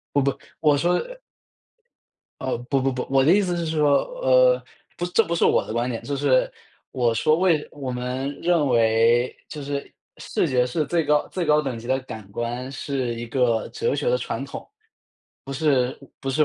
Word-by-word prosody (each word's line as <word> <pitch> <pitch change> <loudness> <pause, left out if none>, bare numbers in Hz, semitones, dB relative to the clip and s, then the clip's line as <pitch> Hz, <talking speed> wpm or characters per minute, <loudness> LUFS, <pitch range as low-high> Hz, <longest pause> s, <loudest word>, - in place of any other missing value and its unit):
我 140 - +5
不 140 0 0 0.2
我 150 -2 +4
说 175 +4 +2 1.4
呃， 130 - -1
不， 135 -2 +2
不， 135 0 +1
不， 125 - -4
我 135 -1 +4
的 160 - +5
意 205 - +5
思 180 -3 -1
是 170 -1 -2
说， 150 -3 +3 0.2
呃， - - +5 0.3
不 175 - -2
这 220 +6 +2
不 170 - -2
是 - - +2
我 - - +3
的 - - -5
观 120 +2 0
点， 115 -2 -4
就 140 -1 -3
是， 135 -2 +2 0.4
我 120 -3 +1
说 155 +8 +2
为 170 -5 +2
我 135 -3 -6
们 130 +3 -3
认 170 -5 +2
为 115 +1 +3
就 150 -2 -7
是 140 0 -5 0.3
视 - - -1
觉 125 -1 +2
是 150 +5 -1
最 165 -1 +1
高 150 0 +2
最 180 -2 -3
高 150 0 +4
等 130 -5 -4
级 115 - -10
的 130 +1 +1
感 110 -5 -9
官， 120 +3 -4
是 135 -3 -3
一 120 +1 -6
个 115 -2 +1
哲 460 +2 -1
学 485 - -1
的 - - +3
传 - - -4
统。 - - -8 1.5
不 135 - -3
是 150 +3 +3
140 Hz, 205 characters per minute, -23 LUFS, 125-160 Hz, 1.5 s, 我